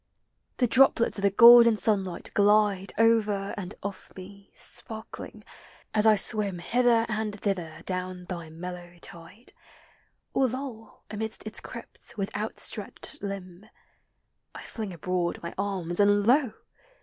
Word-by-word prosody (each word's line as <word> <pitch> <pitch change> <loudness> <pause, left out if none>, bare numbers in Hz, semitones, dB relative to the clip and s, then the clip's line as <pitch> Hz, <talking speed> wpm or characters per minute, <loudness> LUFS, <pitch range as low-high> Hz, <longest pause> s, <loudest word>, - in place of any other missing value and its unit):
The 250 - +3
droplets 245 -3 +4
of - - -4
the 200 - +4
golden 235 +2 +8
sunlight 195 -5 -1
glide 205 -1 +3
Over 215 -3 +2
and 200 -1 -6
off 200 -1 -7
me, 200 +1 -12
sparkling, 220 -1 -5 0.5
as 215 0 +3
I 215 - +7
swim 205 -2 -2
Hither 235 +4 +2
and 215 -1 -3
thither 170 -6 -3
down 185 -1 -4
thy 170 -3 -6
mellow 175 +1 -8
tide, 170 +8 -10 0.8
Or 265 - +3
loll 245 -3 -7
amid 220 +1 -3
its 215 - -5
crypts - - -8
with 195 -1 -3
outstretched 220 +7 -3
limb; 195 -1 -7 0.9
I - - -8
fling 215 -4 -6
abroad 175 +1 -2
my 170 - -5
arms, 190 -3 -3
and 205 0 +4
lo 255 0 +3
205 Hz, 130 wpm, -27 LUFS, 185-220 Hz, 0.9 s, golden